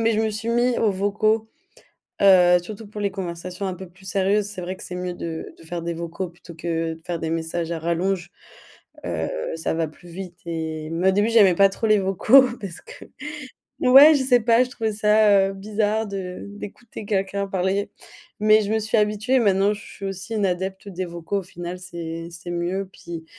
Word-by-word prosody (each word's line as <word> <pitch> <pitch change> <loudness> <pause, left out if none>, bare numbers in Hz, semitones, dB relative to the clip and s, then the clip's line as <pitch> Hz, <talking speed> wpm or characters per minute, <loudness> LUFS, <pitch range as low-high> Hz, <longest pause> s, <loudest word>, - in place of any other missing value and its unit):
mais 225 0 +3
je 220 - +1
me 220 -1 +1
suis 220 +2 -5
mis 240 +1 +2
aux 220 - +3
vocaux, 215 +3 +1 0.7
heu, 180 -2 +7
surtout 215 +4 -9
pour 210 0 -8
les 200 -1 0
conversations 180 0 -5
un 185 -1 -3
peu 190 0 -9
plus 180 +2 -21
sérieuses, 195 +2 +1
c'est 205 -3 -8
vrai 185 +2 -4
que - - -12
c'est 180 - -7
mieux 180 0 -3
de 165 -2 -6
de - - -16
faire 170 +1 -5
des 170 0 -3
vocaux 170 +3 -4
plutôt 170 0 -14
que 165 0 -2
de 165 - -18
faire 170 -2 -3
des 160 - -3
messages 165 +1 -2
à 165 - -2
rallonge, 170 +2 -1 0.8
heu, 85 -2 -2 0.3
ça 160 - -2
va 165 -1 0
plus 175 +3 -15
vite 180 0 -8
et 160 -2 -4
mais 175 +3 0
au - - +4
début 205 +3 +2
j'aimais 200 -6 +6
pas 195 +1 +6
trop 225 +3 -2
les 215 -1 +5
vocaux 195 +8 +6 0.2
parce 185 -4 -7
que - - -12 0.7
ouais, 275 +5 +8
je 270 - +1
sais 250 -2 +4
pas, 235 +2 +4
je 255 - -7
trouvais 220 -5 -2
ça, 210 -2 +4
heu, - - -5
bizarre 210 +2 -1
de 190 -2 -5
d'écouter 205 +2 -9
quelqu'un 200 0 -1
parler, 195 +2 -1 0.5
mais 215 +1 +5
je 205 +1 -3
me 220 - +2
suis 220 +1 0
habituée, 210 +4 +1
et - - +5
maintenant 200 -2 +3
je 205 - -9
suis 195 - -9
aussi 195 +3 -5
une 205 -2 +1
adepte 190 +2 -3
des 185 -1 -4
vocaux, 170 +3 -3
au 195 - -7
final 175 0 -7
c'est 170 -2 -6
c'est 170 +1 -9
mieux, 180 +3 -2
puis, 165 -1 -8
195 Hz, 215 wpm, -23 LUFS, 175-210 Hz, 0.8 s, ouais